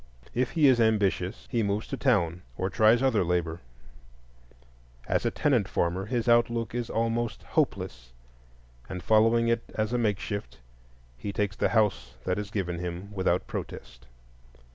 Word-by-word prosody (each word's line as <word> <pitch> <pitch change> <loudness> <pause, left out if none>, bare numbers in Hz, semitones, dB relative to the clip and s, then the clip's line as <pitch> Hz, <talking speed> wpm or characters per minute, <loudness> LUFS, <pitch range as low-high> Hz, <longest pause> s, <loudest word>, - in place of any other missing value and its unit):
If 125 +1 +1
he 155 -4 +5
is 125 -3 +5
ambitious, 105 -3 +1
he 120 -3 +1
moves 100 +1 -1
to - - -2
town 90 -11 +1 0.2
or 95 +1 -1
tries 110 +6 +4
other 115 -7 +3
labor; 85 -1 -1 1.5
as - - +1
a - - +3
tenant 125 -9 +1
farmer 95 +1 -1
his 120 0 -1
outlook 120 -1 +2
is 120 -1 -3
almost 115 -1 -1
hopeless, - - -2 0.8
and 90 -2 -6
following 115 +3 +4
it 115 0 +2
as 110 +2 -1
a 125 - +1
makeshift, 105 -6 -2 0.6
he 100 - -4
takes 100 0 -1
the - - +1
house 105 - +1
that 90 +2 -1
is 105 -1 -5
given 90 -5 -2
him 90 +3 -5
without 95 -2 +1
protest. 65 +3 -7
105 Hz, 150 wpm, -28 LUFS, 90-115 Hz, 1.5 s, he